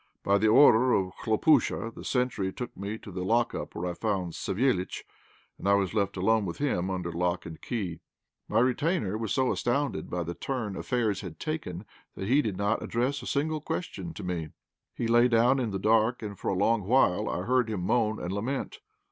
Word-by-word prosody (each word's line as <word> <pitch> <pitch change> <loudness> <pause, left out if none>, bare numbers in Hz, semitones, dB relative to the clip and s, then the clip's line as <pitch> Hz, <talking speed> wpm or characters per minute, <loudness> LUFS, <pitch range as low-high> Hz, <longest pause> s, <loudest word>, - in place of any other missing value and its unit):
By 100 +1 +3
the 110 - +3
order 125 +1 +6
of 95 -1 0
Khlopúsha 115 -1 +2
the - - -10
sentry 125 -7 0
took 125 +5 -7
me 100 +3 -4
to 105 - -11
the 90 0 -4
lockup, 115 +5 0
where 90 - -3
I 90 - -2
found 95 -4 -2
Savéliitch, 100 -3 -1 0.6
and - - -4
I 100 - +6
was 100 -1 0
left 100 -2 0
alone 110 +4 +2
with 85 -4 -4
him 95 -11 0
under 90 -2 -3
lock 85 +1 -1
and 80 -2 -9
key. 95 -9 -3 0.5
My 110 +2 +2
retainer 130 - +1
was 110 -1 -3
so 130 -1 +2
astounded 140 +4 -1
by 90 0 -2
the 85 +1 -4
turn 115 -3 -3
affairs 110 -5 -1
had 90 -6 -8
taken 110 - -4 0.3
that 95 - -5
he 135 +6 +4
did 105 -8 -3
not 100 +3 0
address 130 +4 -1
a 125 - -8
single 155 +2 -1
question 175 +2 -4
to - - -7
me. 85 -3 -3 0.5
He - - -2
lay 120 +1 +5
down 120 +3 +4
in 120 -3 -1
the 100 - -2
dark, 110 +4 +2
and 105 -1 -5
for - - -4
a - - 0
long 105 +1 +2
while 115 -7 +3
I 90 - -2
heard 125 +1 +2
him 105 -5 -2
moan 110 +3 +1
and 90 - -4
lament. 135 - -3
110 Hz, 205 wpm, -28 LUFS, 95-125 Hz, 0.6 s, order